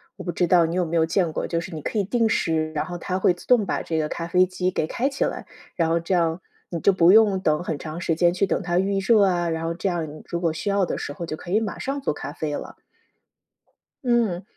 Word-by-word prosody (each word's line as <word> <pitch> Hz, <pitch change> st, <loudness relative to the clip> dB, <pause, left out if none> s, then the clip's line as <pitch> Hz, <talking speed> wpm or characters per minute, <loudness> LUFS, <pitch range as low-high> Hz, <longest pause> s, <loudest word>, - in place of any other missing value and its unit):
我 -, -, -9 dB
不 175 Hz, -, -3 dB
知 175 Hz, -, 0 dB
道 170 Hz, -1 st, +5 dB
你 165 Hz, -, -3 dB
有 180 Hz, -, +2 dB
没 170 Hz, 0 st, -3 dB
有 160 Hz, -, +4 dB
见 170 Hz, 0 st, +1 dB
过， -, -, -3 dB
就 170 Hz, -1 st, -1 dB
是 170 Hz, 0 st, -8 dB
你 155 Hz, -, -6 dB
可 215 Hz, -, -1 dB
以 -, -, +2 dB
定 230 Hz, +3 st, +1 dB
时， 160 Hz, -6 st, 0 dB
然 150 Hz, -, -1 dB
后 175 Hz, -1 st, -6 dB
它 185 Hz, +2 st, -3 dB
会 185 Hz, -, +4 dB
自 -, -, -14 dB
动 245 Hz, -4 st, +4 dB
把 -, -, -1 dB
这 160 Hz, -1 st, -1 dB
个 150 Hz, -, -1 dB
咖 165 Hz, -, -4 dB
啡 180 Hz, +2 st, +4 dB
机 185 Hz, 0 st, -1 dB
给 155 Hz, -, -1 dB
开 255 Hz, +9 st, -1 dB
起 280 Hz, -, -1 dB
来， -, -, -3 dB, 0.3 s
然 165 Hz, -2 st, +1 dB
后 165 Hz, +1 st, +2 dB
这 175 Hz, +3 st, -1 dB
样 165 Hz, +1 st, +1 dB, 0.3 s
你 170 Hz, -, -3 dB
就 200 Hz, -, +4 dB
不 180 Hz, -1 st, +5 dB
用 205 Hz, -3 st, +5 dB
等 155 Hz, -1 st, +1 dB
很 160 Hz, -5 st, -3 dB
长 160 Hz, +3 st, -7 dB
时 165 Hz, -, 0 dB
间 175 Hz, +1 st, +3 dB
去 195 Hz, +2 st, +1 dB
等 -, -, 0 dB
它 175 Hz, 0 st, +1 dB
预 195 Hz, +1 st, 0 dB
热 205 Hz, +1 st, +4 dB
啊， 175 Hz, -3 st, +1 dB
然 165 Hz, 0 st, -2 dB
后 165 Hz, 0 st, -2 dB
这 190 Hz, -, -2 dB
样 170 Hz, -4 st, -2 dB
你 155 Hz, -, -11 dB
如 170 Hz, 0 st, -4 dB
果 165 Hz, -2 st, +1 dB
需 160 Hz, +6 st, -6 dB
要 200 Hz, -1 st, +2 dB
的 -, -, -1 dB
时 145 Hz, -, -5 dB
候 170 Hz, +2 st, -6 dB
就 155 Hz, -, -4 dB
可 175 Hz, -, -9 dB
以 215 Hz, -, +4 dB
马 215 Hz, -3 st, -4 dB
上 275 Hz, +1 st, -3 dB
做 -, -, 0 dB
咖 145 Hz, 0 st, -6 dB
啡 150 Hz, -3 st, -3 dB
了。 -, -, -8 dB, 1.2 s
嗯。 230 Hz, -8 st, +1 dB
175 Hz, 305 characters per minute, -24 LUFS, 165-195 Hz, 1.2 s, 道